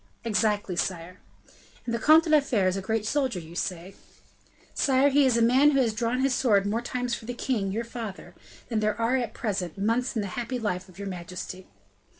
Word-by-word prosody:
"Exactly, 210 -4 0
sire." 175 0 -3 0.7
"And 235 - -3
the 235 - 0
Comte 310 +7 +6
de 320 - -4
la 305 - +7
Fere 225 -9 +1
is 185 - +1
a 195 - -3
great 220 +2 -1
soldier, 260 -4 0
say 175 0 -4
you?" - - -16 0.8
"Sire, 270 +1 +3
he 280 0 +4
is 245 -2 +3
a 230 - +3
man 260 +5 +5
who 275 -2 +2
has 235 -4 +2
drawn 235 +3 -1
his 270 -1 +2
sword 215 -6 +3
more 215 +3 -1
times 245 0 -3
for 225 - -5
the 245 +1 -5
king, 225 -7 -1
your 225 +4 -2
father, 230 -4 -7 0.4
than 225 -3 0
there 215 0 0
are, 230 +3 +2
at 240 -3 -3
present, 195 -7 -3
months 230 +6 0
in 220 - 0
the 200 - -4
happy 245 +2 -3
life 185 -5 -3
of 180 - -17
your 200 0 -6
majesty." 185 0 -7
225 Hz, 215 wpm, -26 LUFS, 195-250 Hz, 0.8 s, la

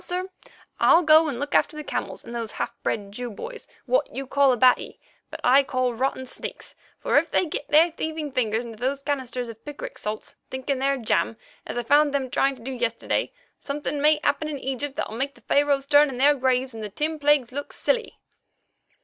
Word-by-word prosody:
"And - - -14
now, 355 - -1
sir, 375 - -9 0.5
I'll 345 - +6
go 315 0 +6
and 260 -5 -3
look 285 +1 -4
after 305 - +2
the 300 - -5
camels - - -4
and 235 - -8
those 230 -2 -4
half - - -3
bred 200 -2 -2
Jew 245 +4 -5
boys 460 - -8 0.2
what - - +1
you 270 - -5
call 275 0 +3
Abati, 250 +1 +3 0.3
but - - -8
I 265 +3 +6
call 255 -2 -1
rotten 260 +2 -2
sneaks, 255 - -7 0.2
for - - +3
if - - -5
they - - +2
get 295 -2 -4
their 320 +3 +5
thieving 315 -2 -4
fingers 235 -2 0
into 225 -2 -10
those 270 +3 -2
canisters 255 -4 -3
of 225 -1 -11
picric 295 -1 -8
salts, 215 +1 -5
thinking 260 +1 -2
they're 275 +1 +1
jam, 225 -1 0 0.3
as - - -5
I 240 - -1
found 290 +3 +4
them 260 -3 -1
trying 275 0 +2
to 240 - -15
do 265 - -5
yesterday, 235 -2 -1 0.3
something 290 0 -3
may 300 +1 +5
happen 310 - +1
in 300 -2 -4
Egypt 270 +1 -4
that'll 280 - -3
make 270 +4 -2
the - - -19
Pharaohs 285 -1 +2
turn 290 0 +5
in 255 - -6
their 285 +3 +5
graves 260 -1 0
and 220 -1 -7
the 210 - -4
Ten 305 +9 -2
Plagues 285 -4 +3
look 285 +2 -5
silly." 475 -2 -1
270 Hz, 215 wpm, -25 LUFS, 245-295 Hz, 0.5 s, I'll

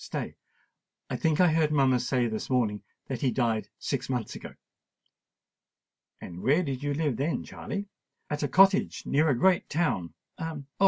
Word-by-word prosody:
stay—I - - -9
think 160 -2 +1
I 180 -1 +6
heard 155 -2 +2
mamma 135 -4 +3
say 125 0 +1
this 110 -2 -3
morning 115 -5 +1 0.3
that 130 -3 -4
he 135 - +2
died 115 -5 0
six 135 -2 -3
months 125 -5 -2
ago." - - -9 1.6
"And 90 0 -8
where 150 +7 +3
did 135 -5 -3
you 145 0 -1
live 145 -6 0
then, 145 +5 -1
Charley?" 200 0 -6 0.4
"At 150 0 -3
a 145 - +1
cottage 195 +5 +4
near 150 +3 +2
a 135 - +2
great 185 +7 +3
town—Oh! 155 - -3
140 Hz, 155 wpm, -28 LUFS, 125-160 Hz, 1.6 s, I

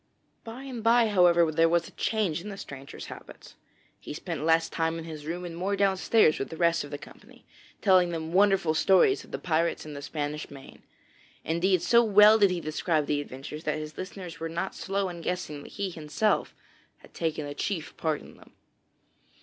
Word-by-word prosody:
By 235 +4 -8
and 250 -5 -7
bye, 230 0 +4
however, 175 -4 +4
there 165 +1 +3
was 170 0 +1
a - - -13
change 200 -8 -1
in 210 - -7
the 195 - -7
stranger's 135 -6 -9
habits. - - -12 0.5
He - - -8
spent 165 -1 -5
less 165 0 +3
time 165 0 -1
in 165 - -6
his 155 -2 -8
room 175 +2 -4
and 170 -1 -7
more 190 +4 -1
downstairs 195 -2 +3
with 135 - -3
the 160 - -8
rest 170 -1 +2
of 145 - -9
the 145 - -5
company, - - -16 0.4
telling 185 -3 +5
them 165 -1 -4
wonderful 195 -4 +3
stories 195 - +4
of - - -17
the - - -4
pirates 165 -1 -1
in 155 - -8
the 140 - -7
Spanish 150 +1 -4
Main. 135 -1 -13 0.6
Indeed, 175 +2 +1
so 235 +4 +5
well 210 0 +7
did 200 -2 +5
he 180 -1 -1
describe 155 0 -1
the 145 0 0
adventures 145 +3 -8
that 155 0 0
his 155 0 -7
listeners 185 -2 -8
were 165 - -4
not 170 +3 -3
slow 195 0 -2
in 175 -2 -7
guessing 165 -4 -4
that - - -13
he 200 -1 -2
had - - -10
himself 180 +8 0 0.6
taken 160 -2 -2
a 145 - -5
chief 160 +1 -4
part 155 -2 -1
in - - -15
them. - - -19
170 Hz, 200 wpm, -27 LUFS, 155-195 Hz, 0.6 s, well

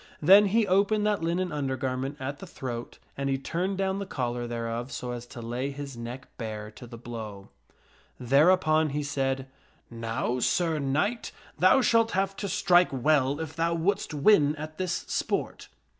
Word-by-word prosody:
Then 195 +6 +7
he 220 +3 +3
opened 200 +3 +2
that 210 -3 +1
linen 175 +2 -1
undergarment 135 -1 -2
at 140 +2 -5
the 195 - -9
throat 120 -7 -6 0.2
and 140 0 -2
he 135 - +1
turned 180 +7 -2
down 195 0 0
the 200 - -5
collar 120 -5 -3
thereof 115 +2 -4
so 125 - -4
as 120 0 -6
to 120 -1 -9
lay 120 +4 -3
his 140 -1 -7
neck 120 +3 -7
bare 110 -2 -5
to 120 +3 -12
the 115 0 -10
blow. 110 -4 -8 0.7
Thereupon 155 +4 +4
he 150 - -1
said, 135 -2 -1 0.3
" - - -37
Now, 115 +2 -2
Sir 160 +4 +1
Knight, 155 - -1 0.3
thou 185 - +6
shalt 230 -2 +3
have 195 +1 0
to 200 - -3
strike, 175 0 +4
well 140 +1 +2
if 160 -1 -5
thou 165 +1 +1
wouldst 195 +5 0
win 150 -1 +4
at 155 +2 -8
this 185 -1 -2
sport." - - -2
145 Hz, 175 wpm, -27 LUFS, 125-185 Hz, 0.7 s, Then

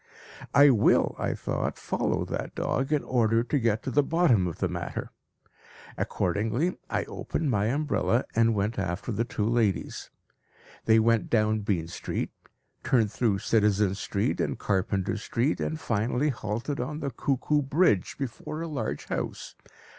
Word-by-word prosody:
"I 140 0 +7
will," 110 -5 +3
I - - -1
thought, - - -2
"follow - - -1
that - - -5
dog 135 +2 -1
in 150 -2 +2
order 115 -2 +2
to 140 +4 0
get 110 -2 +1
to 130 - -3
the 145 - +4
bottom 140 - +3
of 85 - -5
the - - 0
matter. - - -5 0.8
Accordingly, 110 - 0
I - - 0
opened 155 -4 -3
my 105 -3 +1
umbrella 135 -2 +1
and 115 0 +3
went 105 +2 -1
after 95 +4 -3
the 115 +2 0
two 105 -3 -2
ladies. 115 -4 0 0.8
They 110 0 +5
went 115 0 +3
down 110 -1 +2
Bean 100 -6 -1
Street, 85 - -4 0.5
turned 115 -5 +2
through 110 -4 +1
Citizen 105 -3 +3
Street 100 0 -1
and - - -1
Carpenter 95 0 0
Street, 115 +6 -1
and 160 - -2
finally 125 +4 0
halted 115 +3 -3
on 150 +5 -3
the 140 -2 -3
Cuckoo 140 +4 0
Bridge 135 - +2
before 150 +4 -5
a - - -4
large 115 - -3
house. - - -4
115 Hz, 155 wpm, -27 LUFS, 105-140 Hz, 0.8 s, I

